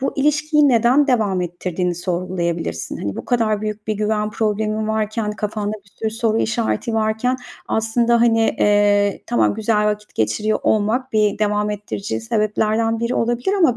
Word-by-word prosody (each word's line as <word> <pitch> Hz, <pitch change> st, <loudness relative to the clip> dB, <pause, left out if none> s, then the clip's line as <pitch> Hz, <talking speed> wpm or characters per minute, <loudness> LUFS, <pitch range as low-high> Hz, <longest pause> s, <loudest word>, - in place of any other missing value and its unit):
Bu 270 Hz, -, -1 dB
ilişkiyi 300 Hz, +1 st, +3 dB
neden 250 Hz, +4 st, +4 dB
devam 215 Hz, -8 st, +1 dB
ettirdiğini 180 Hz, 0 st, -2 dB
sorgulayabilirsin. 170 Hz, -, -3 dB
Hani, 100 Hz, -1 st, -4 dB
bu -, -, -6 dB
kadar 220 Hz, -4 st, +1 dB
büyük 215 Hz, 0 st, -5 dB
bir 215 Hz, -, 0 dB
güven 210 Hz, 0 st, -1 dB
problemin 215 Hz, 0 st, -1 dB
varken, 215 Hz, 0 st, -1 dB
kafanda 210 Hz, -1 st, -3 dB
bir -, -, -21 dB
sürü 220 Hz, -, -1 dB
soru 225 Hz, 0 st, 0 dB
işareti 230 Hz, 0 st, -1 dB
varken. 220 Hz, +3 st, 0 dB, 0.3 s
Aslında, 230 Hz, +1 st, +2 dB
hani, 230 Hz, -1 st, +4 dB, 0.2 s
eee, 205 Hz, -1 st, +3 dB
tamam, 110 Hz, -3 st, +2 dB
güzel 210 Hz, 0 st, +1 dB
vakit 210 Hz, 0 st, -3 dB
geçiriyor 110 Hz, -, 0 dB
olmak 225 Hz, +5 st, +1 dB
bir 210 Hz, -1 st, +2 dB
devam 210 Hz, 0 st, 0 dB
ettirici 210 Hz, 0 st, -4 dB
sebeplerden 225 Hz, 0 st, 0 dB
biri 235 Hz, +2 st, -1 dB
olabilir 240 Hz, -, 0 dB
ama 285 Hz, -10 st, +3 dB
215 Hz, 155 wpm, -20 LUFS, 205-230 Hz, 0.3 s, neden